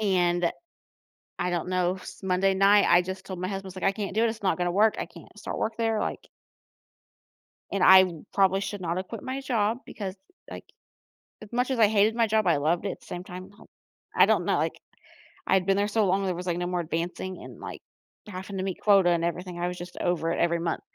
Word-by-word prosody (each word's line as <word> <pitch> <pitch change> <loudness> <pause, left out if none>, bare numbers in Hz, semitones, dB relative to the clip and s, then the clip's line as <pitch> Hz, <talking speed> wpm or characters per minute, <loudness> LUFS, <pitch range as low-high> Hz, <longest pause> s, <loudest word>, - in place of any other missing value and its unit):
And 175 -4 +2 0.9
I 180 - -1
don't 175 -1 -2
know. 185 0 0
S 185 - -11
Monday 190 +1 +2
night, 200 +1 +5
I 175 +1 +6
just 190 +1 -6
told 185 - -5
my 185 - -2
husband, 195 0 -5
was, 190 - -9
like, 185 - -7
"I 195 - +4
can't 200 -1 -5
do 225 - +3
this, 225 -1 -1
it's 215 - -23
not 190 - +1
gonna 175 -1 0
work, 210 +4 +3
I - - -2
can't - - -14
start - - -5
work 220 +1 -2
there," 225 -1 0
like - - -4 1.4
and 195 -2 0
I 190 0 +9 0.3
probably 195 -1 +3
should 200 0 -5
not 170 0 -2
have 185 0 -4
quit 230 - -7
my 260 +1 -3
job 230 -3 0
because, 195 -3 -6 0.3
like, - - -9 0.8
as 215 +1 -12
much 250 +2 0
as 260 - 0
I 220 -2 +6
hated 215 +1 +3
my 230 -1 +2
job, 220 -1 +1
I 170 - +4
loved 160 +6 0
it 195 - -4
same 175 0 -7
time, 185 0 -9
now. 205 - -18 0.5
I - - +6
don't - - +2
know, - - +1
like, - - -2 0.7
I'd 190 -1 +2
been 195 0 +3
there 205 +1 +1
so 215 +1 +2
long 195 +2 +1
there 185 -2 -1
was, 180 +1 -6
like, 175 -1 -1
no 175 - -2
more 180 0 -1
advancing 175 +3 -4
and, - - -11
like, - - -8 0.5
having 190 0 -6
to 185 - -2
meet 190 -2 -4
quota 195 -4 +5
and 170 -1 +1
everything, 175 +1 -3
I 175 +1 -1
was 180 - -5
just 175 +1 -9
over 165 -2 0
it - - -3
every 170 0 +1
month. 165 -1 -2
190 Hz, 235 wpm, -27 LUFS, 175-205 Hz, 1.4 s, I